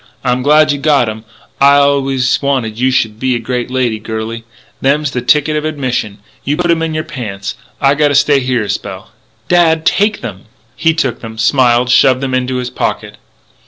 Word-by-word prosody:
I'm 125 -1 0
glad 150 +2 +4
you 145 - -2
got 140 -4 +2
'em. 110 +1 -8 0.3
I 140 +1 +6
allus 135 -3 +2
wanted 130 -6 -1
you 130 +1 +2
should 110 -4 -1
be 130 0 0
a - - -2
great 125 +1 -3
lady, 125 -4 -1
girlie. 110 +1 -5 0.4
Them's 140 +1 +1
the 125 - -3
tickets 150 +4 +2
of - - -8
admission. 130 -9 -3 0.3
You 145 +2 -1
put 175 -1 +1
'em 165 -1 +1
in 160 -1 -2
your 155 - -1
pants. 105 -9 -6 0.3
I 140 0 +3
gotta 145 -1 +1
stay 140 +1 +4
here 125 -3 -1
a 105 - -6
spell - - -6 0.2
" - - -39
"Dad! 160 -2 +2
Take 210 +1 +1
them!" 100 -5 -8 0.3
He 160 +3 +1
took 130 -7 -2
them, 110 -1 -9
smiled, 120 +2 +2
shoved 130 0 +4
them 135 -1 -3
into 130 0 -1
his 125 -1 -3
pocket. - - -3
130 Hz, 200 wpm, -14 LUFS, 120-145 Hz, 0.4 s, I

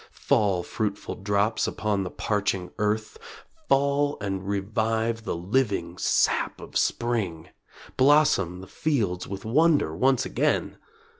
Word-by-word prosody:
Fall, 95 -4 +1
fruitful 105 +1 -3
drops, 100 +3 0
upon 105 -2 -1
the 90 - -4
parching 100 -3 -2
earth, 105 - -1 0.5
Fall, 140 +1 +2
and 95 -1 -4
revive 110 +3 -1
the - - -2
living 95 -2 -1
sap - - +1
of - - -12
spring; 105 -9 -1 0.5
Blossom 130 - +3
the 95 - -11
fields 110 - -1
with 100 +1 -7
wonder 145 - +3
once 130 +6 +2
again! - - 0
105 Hz, 120 wpm, -26 LUFS, 95-125 Hz, 0.5 s, Blossom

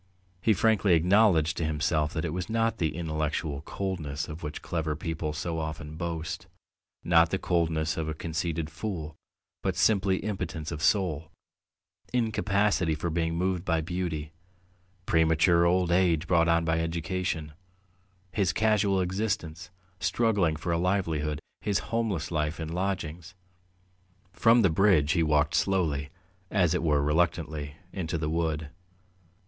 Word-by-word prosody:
He 110 - +4
frankly 100 -3 +3
acknowledged 85 -2 +4
to - - -1
himself 75 0 0
that 80 - -2
it 80 - -3
was 90 +3 -4
not 115 0 0
the 80 -2 0
intellectual 80 -3 -2
coldness 80 -5 -4
of 75 +3 -8
which 75 -1 -6
clever 80 -3 -2
people 80 -1 -3
so 80 +2 -3
often 75 -1 -5
boast, 85 -1 -4 0.6
not 85 -1 +5
the 95 - 0
coldness 80 -4 0
of 80 -1 -2
a 80 - -3
conceited 80 0 -3
fool, 80 -8 -5 0.5
but - - -1
simply 95 -3 +3
impotence 85 -7 -4
of 75 -2 -5
soul, 85 -5 +1 0.8
incapacity 105 -7 +1
for 80 +2 -3
being 85 0 0
moved 90 0 0
by 85 -3 +1
beauty, 80 -2 -3 0.7
premature 80 +1 +4
old 90 0 +2
age 85 -3 +3
brought 85 -1 +3
on 85 0 +3
by 80 0 +1
education, 80 -1 -2 0.8
his 95 -3 +1
casual 105 -3 +2
existence, 90 -3 -2 0.3
struggling 100 -10 +1
for 80 +3 -3
a 85 - +1
livelihood, 80 -5 0 0.2
his 100 -2 +1 0.2
homeless 105 -10 -1
life 75 0 -1
in 80 - -3
lodgings. 90 -1 -3 1.0
From 115 +1 +5
the 95 - +4
bridge 80 -5 +4
he 85 - +2
walked 75 -1 +2
slowly, 80 -7 +1 0.4
as 90 -5 +2
it 90 - 0
were 75 -3 +2
reluctantly, 75 -1 0 0.2
into 85 -3 -2
the 75 -1 -2
wood. 80 -2 -1
85 Hz, 140 wpm, -28 LUFS, 80-95 Hz, 1.0 s, not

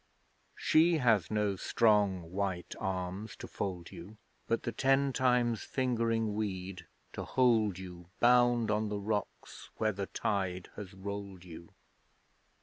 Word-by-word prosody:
She 165 +1 +4
has 115 - +3
no 105 -2 0
strong 100 -5 +2
white 95 -2 -2
arms 95 +3 -3
to - - -9
fold 90 -4 -5
you, 100 +6 -11 0.3
But 115 - 0
the 120 - -2
ten 135 +2 +2
times 125 -3 +2
fingering 115 -4 0
weed 95 -4 -4 0.3
to - - -4
hold 110 -7 +2
you 90 -2 -9
Bound 120 -2 +4
on 105 0 0
the 105 - -2
rocks 105 0 -4
where 110 -1 +1
the 100 0 -4
tide 95 -3 -2
has 100 -2 -8
rolled 100 -1 -6
you. 85 -1 -11
105 Hz, 135 wpm, -32 LUFS, 95-115 Hz, 0.3 s, She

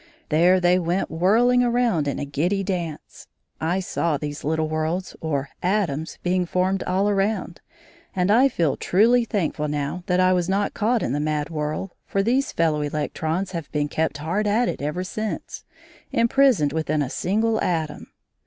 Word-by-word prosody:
There 175 +4 +4
they 180 +1 +3
went 175 +2 -1
whirling 225 +9 +3
around 235 -10 +1
in 140 - -1
a - - -3
giddy 175 +8 -1
dance. 175 -5 -5 0.3
I 170 +4 0
saw 170 -4 -1
these 145 0 -6
little 160 +1 0
worlds 155 +4 -2
or 145 -3 -2
"atoms" 175 -5 -1
being 180 0 +1
formed 185 +2 0
all 190 +2 +1
around, 195 -3 -1 0.5
and 180 +1 +2
I 255 +5 +5
feel 165 - 0
truly 230 +6 +3
thankful 165 -8 -1
now 145 +4 -3
that 180 0 +2
I 185 0 +4
was 180 -1 0
not 200 +1 0
caught 225 +2 +1
in 120 - -1
the 145 - 0
mad 150 +1 -1
whirl, 155 +4 -3
for 195 - 0
these 255 +6 +1
fellow 160 -2 +1
electrons 155 +5 -2
have 170 -5 -6
been 145 -1 -1
kept 155 -1 -1
hard 175 +8 -1
at 225 +4 +2
it - - -3
ever 150 +5 -2
since, 215 +3 -5 0.5
imprisoned 230 - +3
within 155 -2 0
a - - -3
single 220 +4 0
atom. 160 -4 -2
180 Hz, 170 wpm, -23 LUFS, 155-200 Hz, 0.5 s, I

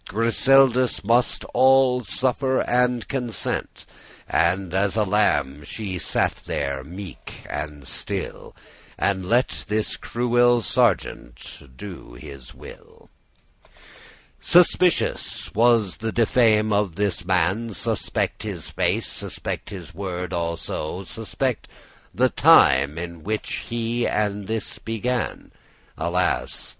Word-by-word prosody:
Griseldis 125 +3 +3
must 120 +4 +1
all 130 -1 +4
suffer 130 +6 0
and 125 -1 +1
consent: 125 -7 -3 0.4
And 95 -2 0
as 95 +1 +1
a 110 - +3
lamb 95 -9 +1
she 95 +2 -5
sat - - 0
there 70 -1 -2
meek 90 +4 -10
and 75 -1 -6
still, - - -3 0.4
And 95 -2 -1
let 120 +3 +1
this 105 0 -1
cruel 120 0 +2
sergeant 70 - -1
do 90 -10 -10
his 65 +1 -11
will - - -15 1.3
Suspicious* 180 0 +2
was 115 -4 +3
the 115 0 -3
diffame 110 -2 +3
of 100 -5 0
this 100 -2 -1
man, 95 0 +2 0.3
*ominous 100 - +1
evil - - +1
reputation - - 0 0.2
Suspect - - -1
his - - -5
face, - - 0
suspect - - -5
his 90 -4 -9
word 90 -1 -5
also, 85 +1 -3
Suspect 115 +4 -3 0.4
the - - +2
time 70 +4 +5
in 85 -1 -6
which 110 +2 -3
he 120 +1 -1
this 105 +1 -2
began: 120 +2 -3 0.4
Alas! 85 +3 -1
105 Hz, 110 wpm, -23 LUFS, 90-120 Hz, 1.3 s, time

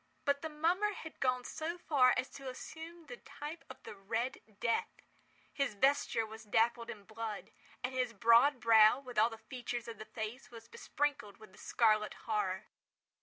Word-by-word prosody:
But 280 -1 +2
the 320 - -4
mummer 350 +7 +1
had 320 -4 -9
gone 255 -1 +1
so 325 +6 -4
far 275 -7 +4
as 255 +1 0
to 270 -1 -7
assume 325 +6 -9
the 245 -5 -9
type 300 +6 -8
of 260 - -11
the - - -8
Red 225 +6 -3 0.2
Death. 230 -1 +1 0.6
His 275 -6 -1
vesture 265 -1 +2
was 220 +1 -10
dabbled 230 +2 +1
in 205 - -7
blood—and 220 +3 -7
his 255 -2 0
broad 235 +5 +5
brow, 225 +1 +6
with 250 -5 -3
all 225 +2 +5
the 225 - -9
features 240 +1 -5
of 230 - -7
the 215 - -7
face, 220 +4 -6
was 230 -1 -12
besprinkled 280 -4 -2
with 215 -3 -15
the 195 - -17
scarlet 215 -2 +2
horror. 210 -3 -1
240 Hz, 170 wpm, -34 LUFS, 220-280 Hz, 0.6 s, brow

